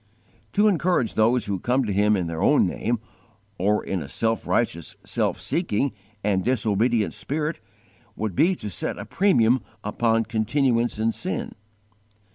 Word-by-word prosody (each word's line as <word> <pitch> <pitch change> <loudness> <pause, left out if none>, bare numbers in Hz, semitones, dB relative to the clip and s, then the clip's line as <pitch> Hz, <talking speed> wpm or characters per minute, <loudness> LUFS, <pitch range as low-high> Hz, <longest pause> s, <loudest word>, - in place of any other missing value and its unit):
To 210 +1 +4
encourage 175 - +1
those 115 +3 +2
who 100 -2 -2
come 125 +6 +1
to 105 - -1
Him 105 +1 +3
in 90 - -1
their 85 -1 -4
own - - +4
name, 120 +2 -1 0.6
or 105 +3 +2
in 95 -3 -2
a 70 - -6
self 115 +7 -1
righteous, 85 0 -1
self - - -1
seeking, 140 - -1 0.3
and 100 -2 +1
disobedient 115 -2 +1
spirit, 150 +3 -2 0.6
would 105 -4 -3
be 180 - +4
to 105 - -6
set - - -3
a - - -6
premium 130 - +3 0.2
upon 115 +2 +1
continuance 115 +2 +1
in 110 +1 +1
sin. - - -4
115 Hz, 150 wpm, -24 LUFS, 105-130 Hz, 0.6 s, To